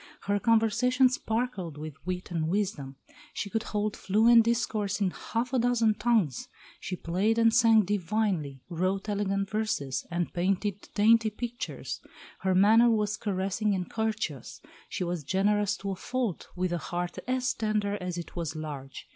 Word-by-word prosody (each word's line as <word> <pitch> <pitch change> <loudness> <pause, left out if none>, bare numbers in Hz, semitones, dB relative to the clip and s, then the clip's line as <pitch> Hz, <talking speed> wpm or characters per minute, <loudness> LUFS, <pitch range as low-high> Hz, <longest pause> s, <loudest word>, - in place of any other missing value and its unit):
Her 205 0 0
conversation 235 +4 +3
sparkled 225 - -2
with 155 0 -6
wit 180 0 -4
and 160 -2 -1
wisdom; 165 -8 -2 0.4
she 200 - -4
could 225 - 0
hold 210 -2 -2
fluent 225 +4 +5
discourse 215 -4 0
in 195 -3 +1
half 235 +7 -3
a 260 - +3
dozen 235 -2 +3
tongues; 210 - +1 0.3
she 185 - -4
played 190 +7 0
and 230 -1 +4
sang 225 -3 +5
divinely, 180 -8 -1
wrote 185 +3 -1
elegant 195 -1 -1
verses, 210 -12 -2
and 175 0 -2
painted 195 +2 -1
dainty 220 +1 +5
pictures. 240 +3 -5 0.4
Her 190 -1 +1
manner 220 +5 +6
was 210 -2 +1
caressing 200 0 -1
and 180 -1 -4
courteous; 215 - -3 0.3
she - - -3
was 175 -3 -3
generous 205 +5 +1
to 200 0 -4
a - - -3
fault, 240 -1 -3
with 180 -1 -1
a 175 - -1
heart 175 +2 -4
as 255 0 0
tender 210 -2 -1
as 180 -1 -4
it 170 - -7
was 170 -2 -3
large. 145 -4 -7
205 Hz, 155 wpm, -28 LUFS, 180-225 Hz, 0.4 s, manner